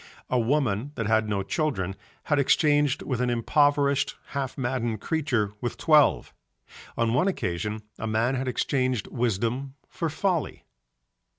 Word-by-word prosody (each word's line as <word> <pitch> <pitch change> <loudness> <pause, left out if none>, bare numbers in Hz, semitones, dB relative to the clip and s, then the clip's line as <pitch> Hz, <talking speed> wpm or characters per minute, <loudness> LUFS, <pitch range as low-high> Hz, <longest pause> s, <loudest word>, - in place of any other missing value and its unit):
A 125 - +3
woman 130 0 0
that 115 - -2
had 110 0 +2
no 100 -2 0
children 95 - -1 0.3
had 145 -2 +1
exchanged 145 0 +3
with 125 -3 -2
an 125 - +1
impoverished 140 +3 +2
half 140 -2 -4
maddened 120 -4 -1
creature 125 -9 0
with 120 - -3
twelve. 150 -3 +3 0.6
On 115 -1 +1
one 130 +10 +2
occasion 105 - -2 0.2
a 115 - -3
man 110 +4 +1
had 130 0 -2
exchanged 130 -2 0
wisdom 120 +3 -1
for 165 - -3
folly. 175 +1 -2
125 Hz, 135 wpm, -26 LUFS, 110-145 Hz, 0.6 s, A